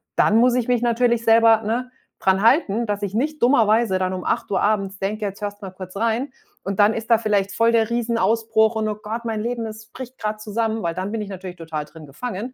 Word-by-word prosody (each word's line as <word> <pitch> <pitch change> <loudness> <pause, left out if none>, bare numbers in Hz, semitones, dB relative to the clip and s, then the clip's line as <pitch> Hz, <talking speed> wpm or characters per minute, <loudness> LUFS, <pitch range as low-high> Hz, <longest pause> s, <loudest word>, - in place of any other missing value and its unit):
Dann 215 - +4
muss 245 +1 +4
ich 250 -2 0
mich 245 -1 +1
natürlich 235 0 +2
selber, 225 -1 +5
ne, 240 +4 -2 0.3
dran 190 +1 +2
halten, 230 - +3
dass 205 -1 -3
ich 200 0 -3
nicht 300 +6 -1
dummerweise 225 -5 +3
dann 185 0 -1
um 185 -1 -5
8:00 195 - -1
abends 200 -2 0
denke: 210 +2 -2
„Jetzt 200 +1 -6
hörst 205 0 -5
mal 190 - -6
kurz 185 0 -10
rein.“ 230 +5 -1 0.3
Und 195 0 -4
dann 205 +1 +5
ist 225 +1 -6
da 230 - +6
vielleicht 205 -3 0
voll 230 +2 +3
der 225 -1 +2
Riesenausbruch 225 -1 +1
und: 220 -1 -1
„Oh 215 - -1
Gott, 225 +3 -5
mein 220 -2 -2
Leben, 235 0 -3
es 220 0 -9
bricht 255 +2 -10
gerade 215 0 -2
zusammen.” 220 0 -2
Weil 170 - -1
dann 185 +3 -4
bin 225 - -3
ich 205 - -6
natürlich 185 -2 -7
total 160 -3 -5
drin 155 0 -13
gefangen, 225 - -6
220 Hz, 230 wpm, -22 LUFS, 200-230 Hz, 0.3 s, da